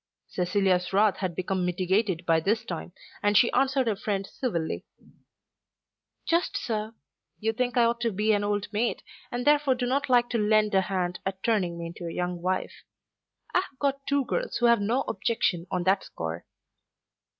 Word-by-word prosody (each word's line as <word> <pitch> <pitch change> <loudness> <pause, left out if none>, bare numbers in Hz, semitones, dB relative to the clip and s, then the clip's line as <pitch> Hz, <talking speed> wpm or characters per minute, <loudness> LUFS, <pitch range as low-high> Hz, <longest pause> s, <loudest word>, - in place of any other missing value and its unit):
Cecilia's 180 0 +1
wrath 205 +1 +4
had 185 -4 -3
become 185 +1 -1
mitigated 185 +1 0
by 165 -1 +4
this 220 +7 0
time, 175 -2 -5 0.3
and 205 0 +3
she 235 - +5
answered 270 0 +2
her 220 -3 +1
friend 195 -1 -2
civilly. 175 -9 -3 1.4
"Just 345 +4 +1
so. 220 - -3 0.4
You 225 +1 0
think 245 +1 -1
I 240 - +6
ought 235 0 +2
to 235 -1 +1
be 210 +2 +2
an 205 0 +1
old 205 0 -1
maid, 230 +3 0 0.3
and 245 0 -3
therefore 290 -2 +4
do 250 0 -2
not 270 +3 0
like 245 -1 +4
to 235 - +1
lend 215 0 +3
a 190 - +5
hand 180 -2 -2
at 190 0 -4
turning 190 -7 +1
me 170 - -5
into 170 +1 -7
a - - -4
young 180 0 -3
wife. 185 +1 -2 0.7
I - - +5
have 365 -8 -7
got 275 0 -1
two 280 -1 +1
girls - - -2
who 240 - +1
have 235 -2 +5
no 235 +6 +1
objection 195 -6 -1
on 180 -1 -1
that 190 +2 +2
score." 85 +1 -6
210 Hz, 185 wpm, -27 LUFS, 185-240 Hz, 1.4 s, I